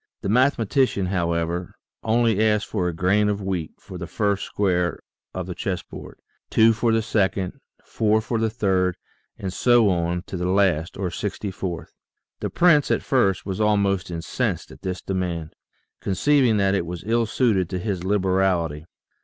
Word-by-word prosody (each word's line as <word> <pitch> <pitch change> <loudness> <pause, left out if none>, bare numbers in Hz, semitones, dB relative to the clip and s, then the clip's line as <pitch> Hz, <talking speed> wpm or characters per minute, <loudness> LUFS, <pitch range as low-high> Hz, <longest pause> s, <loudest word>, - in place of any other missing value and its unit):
The 95 - -3
mathematician, 125 -2 +2
however, 85 -1 -1 0.3
only 110 -2 +2
asked 105 -1 +2
for 90 -5 -2
a - - 0
grain 95 +5 +2
of 105 -1 -1
wheat 95 -5 -3
for - - -10
the - - -5
first 100 -1 -1
square 90 -3 0 0.3
of 95 -1 -4
the 90 - -5
chess 90 0 -3
board, - - -11 0.3
two 115 +1 +5
for 115 +1 +1
the 115 0 +2
second, 95 -4 0 0.2
four 110 0 +1
for 110 +1 -2
the 110 0 +1
third, 95 -5 0 0.4
and 95 -2 -5
so 120 0 +4
on 85 0 -1
to 95 - -6
the 90 +1 -1
last, 95 -4 +1
or 95 -2 -2
sixty 100 +2 -4
fourth. 95 -3 -5 0.5
The - - -3
prince 160 -5 +4
at - - +1
first 100 -8 +1
was 95 +1 -3
almost 100 -3 +1
incensed 85 -1 -3
at - - -14
this 90 -1 -4
demand, 90 -4 -3 0.5
conceiving 120 +4 +2
that 100 -1 +2
it 90 -4 0
was 85 0 -6
ill 115 +1 +1
suited 105 -7 +1
to 95 - -3
his 95 -2 -3
liberal 95 -2 +2
ity. 75 0 -7
95 Hz, 170 wpm, -23 LUFS, 90-110 Hz, 0.5 s, two